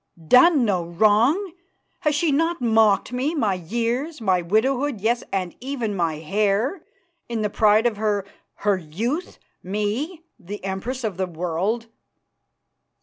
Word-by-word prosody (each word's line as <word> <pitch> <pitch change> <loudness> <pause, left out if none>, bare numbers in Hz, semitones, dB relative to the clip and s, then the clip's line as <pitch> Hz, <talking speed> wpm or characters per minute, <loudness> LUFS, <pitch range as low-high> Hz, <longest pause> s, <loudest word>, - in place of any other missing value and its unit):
"Done 270 - +6
no 185 -5 +1
wrong! 220 - +2 0.5
Has 300 -1 +1
she 305 +1 +2
not 330 +4 +1
mocked 225 -1 +3
me, 275 +6 -1
my 220 -9 +1
years, 235 - -2
my 190 -5 +2
widowhood, 245 +7 +1
yes, 235 +4 0
and 185 -3 -2
even 245 -5 -3
my 165 -4 0
hair, 205 - 0 0.5
in 225 -2 -2
the 210 - -1
pride 215 +2 +4
of 230 -3 +1
her 205 -2 0 0.4
her 205 -2 +3
youth, 225 - -4 0.2
me, 215 - -3 0.2
the 205 +1 -8
Empress 210 +7 -4
of 210 -5 -3
the 190 -1 -1
World?" 180 +7 -2
220 Hz, 140 wpm, -23 LUFS, 195-260 Hz, 0.5 s, Done